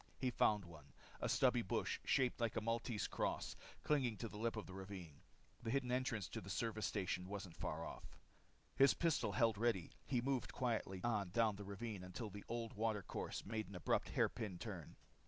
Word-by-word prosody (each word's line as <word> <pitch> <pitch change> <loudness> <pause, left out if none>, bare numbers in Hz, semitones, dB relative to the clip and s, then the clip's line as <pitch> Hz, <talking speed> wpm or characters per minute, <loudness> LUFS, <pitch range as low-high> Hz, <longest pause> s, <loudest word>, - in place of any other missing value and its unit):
He 130 -1 +1
found 105 -4 +3
one, 75 -5 -12 0.3
a - - 0
stubby 125 -2 +5
bush, 110 +2 0
shaped 130 -3 +2
like 115 -2 +1
a - - +3
Maltese 115 0 0
cross, - - -1 0.3
clinging 130 -7 +2
to 115 - -3
the 105 -1 -8
lip 115 +1 +1
of 110 - -3
the 95 - -9
ravine. 95 -5 -7 0.4
The 115 - -3
hidden 130 0 +1
entrance 125 -6 +1
to - - -4
the 95 - -8
service 110 0 0
station 90 -1 -1
wasn't 100 -3 -5
far - - -2
off. - - -8 0.6
His 135 0 +7
pistol 165 -3 +2
held 115 -4 +3
ready, 115 -7 +2 0.2
he 125 - +2
moved 130 +1 0
quietly 110 -7 0
on 105 -5 +1
down 110 +2 +3
the 100 - -6
ravine 100 -1 -4
until 95 +4 -5
the 100 +1 -7
old 115 -1 -2
water 110 -2 0
course - - -4
made 110 +1 -2
an 100 - -8
abrupt 90 - +1
hairpin 105 -6 +1
turn. 90 -6 -6
110 Hz, 190 wpm, -41 LUFS, 95-120 Hz, 0.6 s, His